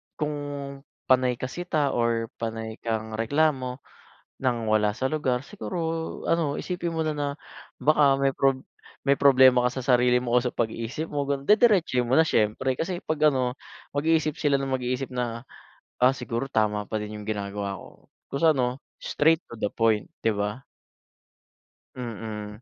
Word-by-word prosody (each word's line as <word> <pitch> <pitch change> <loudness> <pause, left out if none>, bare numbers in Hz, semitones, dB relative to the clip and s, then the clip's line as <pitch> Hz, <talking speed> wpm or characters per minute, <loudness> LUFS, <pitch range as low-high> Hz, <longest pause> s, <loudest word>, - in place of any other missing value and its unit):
"Kung 150 -1 -2 0.7
panay 130 -1 +3
ka - - -4
sita 155 -5 -1
or 115 -1 0
panay 115 -1 -4
kang 110 -1 -2
reklamo 130 +2 0 0.6
nang 120 -4 -1
wala 105 -1 +3
sa 130 +5 -1
lugar 130 -5 0
siguro 195 +2 -6 0.5
ano, 165 -4 +1
isipin 175 -2 -3
mo 160 - -1
na 155 - 0
na, 145 -1 -1 0.5
baka 145 -2 +5
may 135 0 +3
prob 135 -1 +2 0.4
may 140 0 +3
problema 130 -2 +6
ka - - -2
sa - - -10
sarili 125 0 +3
mo 120 - -3
o - - +7
sa 125 - -1
pag-iisip 115 +7 -3
mo." 145 -1 -1
Ganu 140 -1 -1
didiretsohin 200 - +4
mo 125 - 0
na 160 - +7
siyempre. 120 +4 +1
Kasi, 175 +1 -3
'pag 155 -1 0
ano, 130 0 -1 0.4
mag-iisip 155 0 +1
sila 145 -2 +2
na 135 - -3
mag-iisip 130 0 -2
na, 120 -2 -3 0.6
"Ah, 130 +2 +5
siguro 125 0 -3
tama 105 -2 0
pa - - -3
din 105 0 -6
yung 105 - -10
ginagawa 100 -1 -3
ko." - - -15 0.2
Kung 140 - -2
sa 165 - +6
ano 125 0 -1 0.2
straight 160 +3 +2
to 115 - -9
the - - +1
point, 110 -2 +1 0.2
'di 115 - +4
ba? 105 +5 -3 1.3
Mm. 110 -3 -6
125 Hz, 165 wpm, -26 LUFS, 115-145 Hz, 1.3 s, o